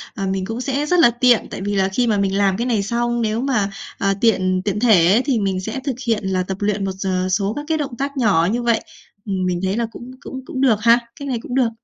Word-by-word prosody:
ờ, 195 Hz, -2 st, -3 dB
mình 190 Hz, 0 st, -2 dB
cũng 225 Hz, +4 st, -4 dB
sẽ 280 Hz, +2 st, -1 dB
rất 360 Hz, +3 st, +2 dB
là 240 Hz, -, +7 dB
tiện, 240 Hz, 0 st, +3 dB
tại -, -, -6 dB
vì 205 Hz, +1 st, -2 dB
là 190 Hz, -1 st, +2 dB
khi 240 Hz, +5 st, 0 dB
mà 215 Hz, -2 st, +2 dB
mình 195 Hz, 0 st, 0 dB
làm 195 Hz, -2 st, +2 dB
cái 235 Hz, -, -1 dB
này 220 Hz, -5 st, +1 dB
xong, 240 Hz, +3 st, -1 dB
nếu 220 Hz, +1 st, -1 dB
mà, 245 Hz, -7 st, 0 dB, 0.3 s
ờ, 195 Hz, 0 st, +1 dB
tiện 185 Hz, -5 st, +2 dB
tiện 205 Hz, 0 st, -1 dB
thể 190 Hz, -7 st, +5 dB
ấy 230 Hz, +5 st, +4 dB
thì 265 Hz, -5 st, +1 dB
mình 195 Hz, -2 st, -1 dB
sẽ 220 Hz, +7 st, -4 dB
thực 270 Hz, -3 st, -2 dB
hiện 225 Hz, -3 st, +1 dB
là 185 Hz, -1 st, 0 dB
tập 190 Hz, +1 st, -5 dB
luyện 205 Hz, -1 st, -1 dB
một 195 Hz, -, -2 dB
giờ 185 Hz, -1 st, -1 dB
số 200 Hz, +2 st, 0 dB
các 290 Hz, -, -5 dB
cái 320 Hz, -1 st, +1 dB
động 270 Hz, -6 st, -4 dB
tác 280 Hz, +1 st, -3 dB
nhỏ 195 Hz, -9 st, +3 dB
như 240 Hz, +2 st, -1 dB
vậy. 235 Hz, -2 st, +2 dB, 0.5 s
Mình 185 Hz, -3 st, -1 dB
thấy 190 Hz, +3 st, 0 dB
là 235 Hz, -, 0 dB
cũng 245 Hz, +2 st, -10 dB
cũng 265 Hz, -, -7 dB
cũng 260 Hz, -, -4 dB
được 230 Hz, -6 st, +3 dB
ha, 235 Hz, +2 st, +5 dB, 0.2 s
cách 280 Hz, -, -6 dB
này 250 Hz, -4 st, -2 dB
cũng 245 Hz, -, -6 dB
được. 255 Hz, -3 st, +3 dB
220 Hz, 275 wpm, -20 LUFS, 195-245 Hz, 0.5 s, là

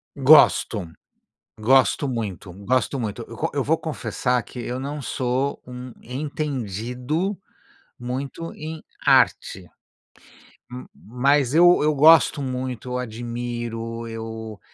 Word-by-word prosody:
Gosto. 110 Hz, -, +5 dB, 0.7 s
Gosto 130 Hz, +4 st, +3 dB
muito, 105 Hz, -6 st, -4 dB
gosto 130 Hz, +2 st, +1 dB
muito. 110 Hz, -4 st, -4 dB
Eu -, -, -9 dB
co -, -, -1 dB
eu -, -, +1 dB
vou -, -, +1 dB
confessar 125 Hz, -1 st, -2 dB
que 125 Hz, -, -12 dB
eu 125 Hz, +2 st, -4 dB
não 145 Hz, +2 st, -5 dB
sou 130 Hz, +1 st, -2 dB
um 125 Hz, 0 st, -9 dB
entendido 130 Hz, -, -3 dB, 0.6 s
muito 135 Hz, +6 st, -5 dB
em 155 Hz, 0 st, -7 dB, 0.2 s
arte, -, -, +3 dB, 1.0 s
m 125 Hz, +1 st, -8 dB
mas 135 Hz, +3 st, +1 dB
eu 175 Hz, -1 st, +6 dB
eu 155 Hz, -, +3 dB
gosto 150 Hz, 0 st, +6 dB
muito, 130 Hz, -2 st, -4 dB
eu 125 Hz, -, -2 dB
admiro, 115 Hz, -1 st, -5 dB
eu, 110 Hz, -2 st, -7 dB
125 Hz, 115 wpm, -23 LUFS, 115-140 Hz, 1.0 s, eu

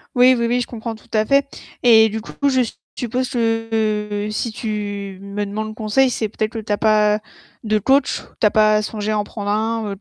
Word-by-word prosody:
Oui 250 Hz, +1 st, +6 dB
oui 235 Hz, -, 0 dB
oui 245 Hz, +1 st, +1 dB
je 245 Hz, -, -2 dB
comprends 230 Hz, -1 st, -5 dB
tout 220 Hz, -, -19 dB
à 215 Hz, 0 st, +2 dB
fait. 275 Hz, +3 st, +3 dB, 0.4 s
Et 220 Hz, -2 st, +7 dB
du 220 Hz, -, -3 dB
coup 280 Hz, +5 st, -2 dB
je 255 Hz, -4 st, +2 dB, 0.3 s
suppose 250 Hz, +2 st, -2 dB
que 220 Hz, -3 st, -1 dB
si 220 Hz, +2 st, -2 dB
tu 205 Hz, -3 st, -4 dB
me 200 Hz, +1 st, -4 dB
demandes 215 Hz, +2 st, -4 dB
conseil, 225 Hz, +5 st, +2 dB
c'est 220 Hz, -3 st, -1 dB
peut-être 215 Hz, +1 st, -3 dB
que 225 Hz, -, -5 dB
tu 215 Hz, -1 st, -6 dB
as -, -, 0 dB
pas 215 Hz, -1 st, +3 dB, 0.4 s
de 215 Hz, -1 st, +1 dB
coach? 270 Hz, +5 st, +2 dB, 0.2 s
Tu -, -, +4 dB
as -, -, 0 dB
pas 215 Hz, 0 st, +4 dB
songé 215 Hz, 0 st, -3 dB
à 215 Hz, -, +1 dB
en 205 Hz, -, 0 dB
prendre 205 Hz, -1 st, -6 dB
un 220 Hz, +2 st, 0 dB
ou -, -, -7 dB
220 Hz, 215 wpm, -20 LUFS, 210-235 Hz, 0.4 s, Et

